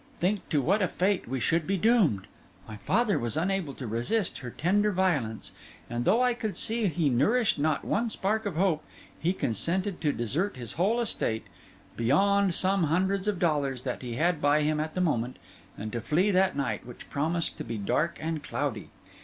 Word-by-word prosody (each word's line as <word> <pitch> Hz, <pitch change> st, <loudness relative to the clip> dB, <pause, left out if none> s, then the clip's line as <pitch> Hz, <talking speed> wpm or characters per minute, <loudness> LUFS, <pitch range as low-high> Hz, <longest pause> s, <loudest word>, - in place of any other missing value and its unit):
Think 195 Hz, +3 st, 0 dB
to 145 Hz, -4 st, +1 dB
what 200 Hz, +9 st, +2 dB
a 185 Hz, -, +3 dB
fate 190 Hz, -, 0 dB
we 130 Hz, +2 st, -2 dB
should 165 Hz, +5 st, +1 dB
be 195 Hz, +1 st, +1 dB
doomed!' 185 Hz, -, +3 dB, 0.4 s
My 110 Hz, -, -7 dB
father 205 Hz, -, +1 dB
was 120 Hz, +4 st, -3 dB
unable 180 Hz, -4 st, -1 dB
to 130 Hz, -, -7 dB
resist 120 Hz, -, -1 dB
her 125 Hz, -, -6 dB
tender 205 Hz, -, +1 dB
violence; 150 Hz, -, 0 dB, 0.4 s
and 120 Hz, 0 st, -2 dB
though 225 Hz, +7 st, +4 dB
I 250 Hz, -1 st, +3 dB
could 220 Hz, -3 st, -4 dB
see 225 Hz, -1 st, 0 dB
he 170 Hz, -3 st, +1 dB
nourished 205 Hz, -, +2 dB
not 150 Hz, 0 st, 0 dB
one 230 Hz, +2 st, 0 dB
spark 215 Hz, +1 st, -1 dB
of 190 Hz, -, -4 dB
hope, 170 Hz, -3 st, +1 dB, 0.4 s
he 170 Hz, -, +1 dB
consented 180 Hz, -, -1 dB
to 150 Hz, -2 st, +2 dB
desert 145 Hz, -, -1 dB
his 120 Hz, -2 st, -7 dB
whole 205 Hz, +8 st, +1 dB
estate, 110 Hz, -, -1 dB, 0.5 s
beyond 195 Hz, -, +3 dB
some 190 Hz, -2 st, +2 dB
hundreds 190 Hz, +5 st, +1 dB
of 210 Hz, -3 st, +1 dB
dollars 145 Hz, -7 st, 0 dB
that 125 Hz, -, -3 dB
he 120 Hz, -2 st, -5 dB
had 165 Hz, +3 st, +1 dB
by 145 Hz, +1 st, +3 dB
him 150 Hz, 0 st, +1 dB
at 155 Hz, +1 st, -3 dB
the 185 Hz, -, 0 dB
moment, 125 Hz, -8 st, 0 dB, 0.4 s
and 110 Hz, +1 st, -5 dB
to 120 Hz, -, -3 dB
flee 180 Hz, -, +2 dB
that 190 Hz, -2 st, +3 dB
night, 140 Hz, -3 st, -1 dB
which 125 Hz, -1 st, -11 dB
promised 160 Hz, +4 st, -1 dB
to -, -, -3 dB
be 115 Hz, -1 st, -4 dB
dark 155 Hz, +11 st, 0 dB
and 160 Hz, -1 st, -3 dB
cloudy. 140 Hz, -7 st, -3 dB
165 Hz, 195 wpm, -28 LUFS, 135-195 Hz, 0.5 s, though